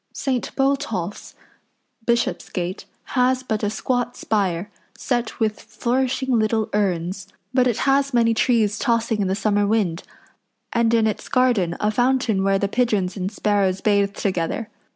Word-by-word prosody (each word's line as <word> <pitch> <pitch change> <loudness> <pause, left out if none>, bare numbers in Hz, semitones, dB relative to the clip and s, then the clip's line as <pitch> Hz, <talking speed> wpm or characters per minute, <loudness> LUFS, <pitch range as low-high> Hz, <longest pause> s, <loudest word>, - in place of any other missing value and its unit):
St. 260 -3 -1
Botolph's, 270 -9 -1 0.7
Bishopsgate, 190 -6 -1 0.3
has 255 0 +2
but 220 -4 -2
a 205 - 0
squat 245 +2 -2
spire, 200 -2 -1 0.3
set 240 -3 -2
with 215 -2 0
flourishing 255 0 0
little 220 0 0
urns; 190 -1 -1 0.3
but 255 -1 +4
it 240 - 0
has 275 0 +3
many 230 -2 +3
trees 220 -3 +2
tossing 230 -2 +1
in 195 - +1
the 190 - 0
summer 205 0 +1
wind, 200 -6 0 0.7
and 230 -1 +2
in 225 -1 +3
its 215 - -2
garden 230 -10 +2
a 210 - +1
fountain 245 -4 +1
where 195 0 +3
the 200 - 0
pigeons 205 -5 0
and 190 -1 -3
sparrows 200 -3 +1
bathe 200 -1 +2
together. 190 +4 -2
215 Hz, 145 wpm, -22 LUFS, 200-245 Hz, 0.7 s, but